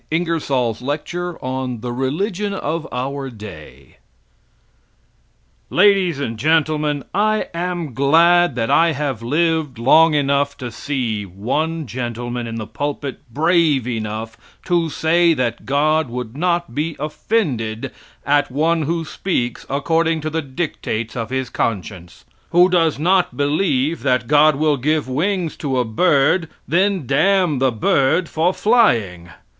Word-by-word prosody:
Ingersoll's 145 -9 -1
lecture 165 +6 -4
on 130 -3 -3
The 120 0 -4
Religion 195 - -2
of 160 -2 -3
Our 135 +2 -3
Day 80 - -12 1.7
Ladies 185 -5 +3
and 115 -6 -4
Gentlemen: 150 0 +1
I 215 +2 +1
am 170 -4 -3
glad 170 +7 +4
that 115 -2 -1
I 165 0 +4
have 140 -5 -3
lived 155 +1 0
long 155 +7 +5
enough 140 0 +1
to 125 -3 -6
see 115 -4 -3
one 145 - -2
gentleman 120 0 -4
in 115 - -5
the 110 -1 -4
pulpit 145 +2 -4
brave 155 -2 +2
enough 110 -1 -4 0.3
to 170 -2 +1
say 165 +2 +2
that 125 -4 -2
God 150 +1 +2
would 120 -1 -6
not 175 -3 -1
be 155 +3 -2
offended 140 - -2 0.3
at 145 +1 +2
one 160 +4 +1
who 165 +2 -2
speaks 155 -6 -3
according 160 +4 +1
to 155 +1 -3
the 160 +1 -1
dictates 130 -6 -4
of 115 -2 -4
his 130 -1 -3
conscience; 95 -6 -4 0.2
who 175 +2 +5
does 165 -4 +2
not 180 +4 +1
believe 145 0 0
that 125 -2 +1
God 150 +2 +5
will 150 0 +1
give 150 +2 0
wings 170 +5 -1
to 135 -4 -2
a 125 - +1
bird, 145 +7 +2
and - - -21 0.2
then 185 -2 +2
damn 175 +2 +2
the 130 -1 +2
bird 135 +9 +1
for 165 +4 +1
flying. 115 - +2
145 Hz, 135 wpm, -19 LUFS, 125-165 Hz, 1.7 s, long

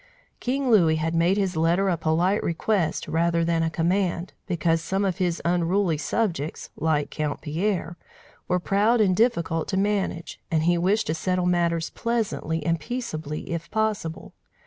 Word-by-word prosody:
King 260 0 0
Louis 170 -7 +5
had 160 +1 -1
made 170 +4 +3
his 190 -3 0
letter 170 +5 +2
a 185 - +2
polite 170 +5 +1
request 170 0 0
rather 170 +1 +1
than 165 -1 +1
a 165 - +1
command, 175 +1 0
because 165 -2 +1
some 195 +4 -1
of 190 -3 -1
his 175 -2 -1
unruly 175 -1 +1
subjects, 165 -6 -2
like 155 -2 0
Count 150 -2 -3
Pierre, 170 +2 -2 0.5
were 180 0 +1
proud 210 +6 +2
and 190 -4 +3
difficult 170 -8 +1
to 190 - -1
manage, 195 -4 -1
and 160 -1 +1
he 175 +1 +3
wished 195 +6 +1
to 155 - -1
settle 180 +2 -1
matters 170 -2 +1
pleasantly 205 -9 -2
and 165 0 +1
peaceably, 155 - -5
if 170 0 -4
possible. 210 -7 -2
175 Hz, 160 wpm, -25 LUFS, 165-195 Hz, 0.5 s, Louis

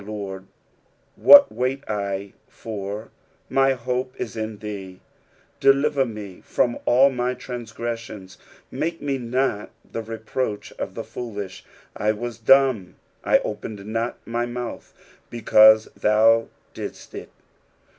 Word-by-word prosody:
Lord, 100 -2 -7 0.7
what 285 0 +8
wait 130 +2 -2
I 100 -1 -3
for? 105 0 -7 0.4
my 135 0 +3
hope 125 +1 -3
is 110 - -4
in 110 -1 -4
thee, 100 -3 -7
S - - -35 0.6
Deliver 140 0 +3
me 105 -5 -8
from 120 -1 0
all 135 +3 +5
my 125 0 -1
transgressions: 115 -6 -7 0.3
make 165 +1 -2
me 140 -2 -2
not 125 -3 -1 0.2
the 115 - -5
re 115 0 -7
proach 110 -1 -3
of - - -4
the - - -4
foolish. 100 -6 -7 0.4
9 105 - -1
I - - +5
was 120 +1 -6
dumb, 120 -7 +4 0.3
I - - +5
opened 100 -2 -6
not 115 +2 -2
my 120 +1 -2
mouth; 120 0 -6 0.4
because 110 -1 +6
thou 115 +2 +4 0.3
didst - - -8
it. - - -8
115 Hz, 130 wpm, -23 LUFS, 105-125 Hz, 0.7 s, what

